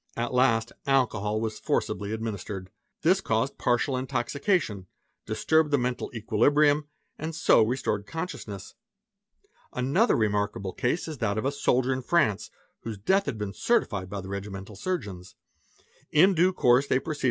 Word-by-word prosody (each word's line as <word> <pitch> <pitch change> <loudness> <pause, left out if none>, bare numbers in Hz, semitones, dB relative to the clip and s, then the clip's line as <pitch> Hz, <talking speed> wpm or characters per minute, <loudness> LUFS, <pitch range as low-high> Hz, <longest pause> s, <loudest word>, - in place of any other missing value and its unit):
At 120 +2 -2
last 120 -3 +3 0.2
alcohol 110 -6 +1
was 110 -1 -3
forcibly 100 0 -1
administered. 100 -4 -5 0.3
'This 185 +5 +4
caused 115 +5 -1
partial 125 +2 +1
intoxication, 130 - -1 0.4
disturbed 160 -1 +2
the 145 - +3
mental 125 -1 -2
equilibrium, 145 +7 +3 0.3
and 160 +1 -4
so 115 - +5
restored 110 -3 -1
consciousness. 115 - -6 1.0
Another 140 - +2
remarkable 105 -3 -1
case 140 +9 -1
is 155 -5 -6
that 105 -2 0
of 110 - -2
a 135 - +2
soldier 130 -2 +1
in 130 - -3
France 125 - +1 0.3
whose 110 -2 -6
death 190 - +1
had 130 -5 -2
been 105 -2 -4
certified 105 - 0
by 100 0 -4
the 95 - -9
regimental 100 +1 -6
surgeons. 100 - -5
115 Hz, 130 wpm, -27 LUFS, 105-145 Hz, 1.0 s, so